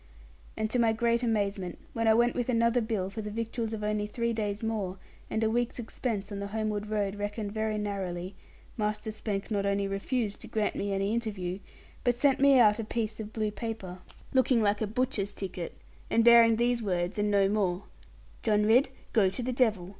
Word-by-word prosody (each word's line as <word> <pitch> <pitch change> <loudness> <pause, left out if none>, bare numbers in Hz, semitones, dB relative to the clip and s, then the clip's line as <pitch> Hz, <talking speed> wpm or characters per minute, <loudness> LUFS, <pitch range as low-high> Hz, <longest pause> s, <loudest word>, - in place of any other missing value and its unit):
And 220 0 0
to 250 - +1
my 230 -1 +4
great 235 +1 +1
amazement, 200 -5 -1 0.2
when 230 -1 0
I 220 - +6
went 240 +1 +3
with 245 0 -2
another 235 0 +3
bill 215 -4 -2
for 220 - -5
the 210 - -5
victuals 225 +1 -3
of 220 -1 -4
only 210 0 0
three 235 +2 -1
days 210 -1 -2
more, 205 -4 -2 0.3
and 220 - 0
a 220 - +3
week's 240 +1 0
expense 225 -3 -3
on 200 - -4
the 200 - -3
homeward 215 0 -2
road 205 -2 0
reckoned 205 0 -3
very 215 0 -1
narrowly, 190 -3 -3 0.4
Master 210 0 -2
Spank 210 -1 -4
not 200 -2 +1
only 200 0 +1
refused 205 +2 -2
to - - -9
grant 215 -1 -1
me 200 - -2
any 195 +2 0
interview, 200 -6 -3 0.4
but 245 -1 +2
sent 275 +2 +3
me 275 0 +6
out 215 -3 +5
a - - -1
piece 220 0 -3
of 215 -1 -6
blue 215 -1 -1
paper, 205 -5 -5 0.3
looking 260 -2 +4
like 210 -1 +1
a 215 - +1
butcher's 220 -3 -1
ticket, 185 -4 -6 0.3
and 230 - +3
bearing 235 -1 +7
these 240 +1 +1
words 180 -1 -1
and 205 0 +1
no 200 -1 +4
more, 195 -2 0 0.6
'John 210 -2 +2
Ridd, 245 +6 +5 0.2
go 205 -5 +4
to 195 +6 -4
the 255 +1 -1
devil. 215 -8 +1
215 Hz, 200 wpm, -29 LUFS, 200-230 Hz, 0.6 s, bearing